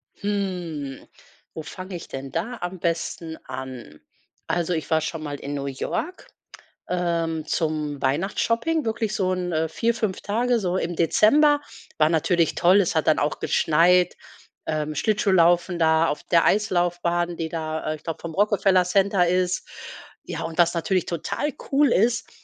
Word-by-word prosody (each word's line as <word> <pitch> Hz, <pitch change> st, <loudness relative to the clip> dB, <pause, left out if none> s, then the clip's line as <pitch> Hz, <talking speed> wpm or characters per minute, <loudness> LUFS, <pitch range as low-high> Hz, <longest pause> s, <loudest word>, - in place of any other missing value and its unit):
Hm, 180 Hz, -9 st, -4 dB, 0.5 s
wo 160 Hz, -, -5 dB
fange 185 Hz, +3 st, -8 dB
ich 170 Hz, -, -8 dB
denn 135 Hz, 0 st, -7 dB
da 245 Hz, -, -3 dB
am 180 Hz, +1 st, -5 dB
besten 165 Hz, -1 st, -3 dB
an? 130 Hz, -, -8 dB, 0.5 s
Also, 175 Hz, 0 st, 0 dB
ich 160 Hz, -, -3 dB
war 160 Hz, -1 st, +3 dB
schon 160 Hz, +1 st, -4 dB
mal 145 Hz, -1 st, -5 dB
in 140 Hz, -, -5 dB
New 140 Hz, -1 st, -3 dB
York, 305 Hz, -, -4 dB, 0.6 s
ähm, 170 Hz, -3 st, -1 dB
zum 155 Hz, -3 st, -2 dB
Weihnachtsshopping, 230 Hz, -, 0 dB
wirklich 220 Hz, -1 st, -1 dB
so 185 Hz, -2 st, +1 dB
'n 175 Hz, -3 st, -1 dB
4, 230 Hz, +8 st, 0 dB
5 215 Hz, -5 st, -2 dB
Tage, 240 Hz, +3 st, +1 dB
so 185 Hz, -3 st, -1 dB
im 175 Hz, -1 st, -2 dB
Dezember. 290 Hz, -, +4 dB, 0.4 s
War 155 Hz, 0 st, +4 dB
natürlich 165 Hz, 0 st, +1 dB
toll. 185 Hz, +3 st, +5 dB
Es 175 Hz, -, -1 dB
hat 160 Hz, -, +1 dB
dann 155 Hz, -, +4 dB
auch 145 Hz, -, -1 dB
geschneit, 175 Hz, +3 st, +3 dB, 0.5 s
ähm, 155 Hz, -1 st, -2 dB
Schlittschuhlaufen 180 Hz, -3 st, +3 dB
da 160 Hz, 0 st, +3 dB
auf 150 Hz, -, -3 dB
der 170 Hz, -1 st, +3 dB
Eislaufbahn, 175 Hz, -3 st, +1 dB
die 160 Hz, -1 st, -3 dB
da 160 Hz, -1 st, -3 dB
äh, -, -, -2 dB
ich -, -, -25 dB
glaube, 165 Hz, -2 st, -5 dB
vom 170 Hz, -1 st, -6 dB
Rockefeller 195 Hz, -1 st, +3 dB
Center 190 Hz, 0 st, +2 dB
ist. 180 Hz, +1 st, 0 dB, 0.6 s
Ja, -, -, -5 dB
und 165 Hz, 0 st, -6 dB
was 170 Hz, -1 st, +4 dB
natürlich 180 Hz, +2 st, 0 dB
total 175 Hz, -, -2 dB, 0.2 s
cool 285 Hz, +1 st, +4 dB
ist, 225 Hz, +3 st, +2 dB
175 Hz, 160 wpm, -24 LUFS, 160-195 Hz, 0.6 s, toll